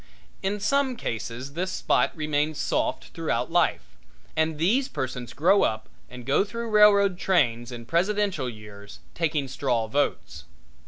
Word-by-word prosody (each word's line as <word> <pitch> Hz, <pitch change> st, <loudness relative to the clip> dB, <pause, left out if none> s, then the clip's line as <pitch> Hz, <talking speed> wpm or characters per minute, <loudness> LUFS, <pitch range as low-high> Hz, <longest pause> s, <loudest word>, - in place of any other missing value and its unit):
In 200 Hz, +2 st, -1 dB
some 265 Hz, +4 st, +1 dB
cases 120 Hz, -, -5 dB
this 185 Hz, +4 st, -2 dB
spot -, -, +1 dB
remains 150 Hz, 0 st, -1 dB
soft -, -, -1 dB
throughout 155 Hz, -6 st, -2 dB
life, 175 Hz, -1 st, +2 dB, 0.5 s
and 160 Hz, 0 st, 0 dB
these 225 Hz, -, +2 dB
persons 125 Hz, -, -5 dB
grow 185 Hz, +6 st, +3 dB
up 110 Hz, 0 st, -1 dB, 0.2 s
and 125 Hz, -1 st, -10 dB
go 140 Hz, +8 st, +3 dB
through 230 Hz, +2 st, -6 dB
railroad 200 Hz, -3 st, +5 dB
trains 120 Hz, -11 st, +1 dB
in 120 Hz, -1 st, -8 dB
presidential 185 Hz, -, 0 dB
years 105 Hz, -2 st, -11 dB, 0.2 s
taking 155 Hz, -4 st, -1 dB
straw 125 Hz, -3 st, -1 dB
votes. 110 Hz, -, -2 dB
155 Hz, 140 wpm, -26 LUFS, 120-195 Hz, 0.5 s, railroad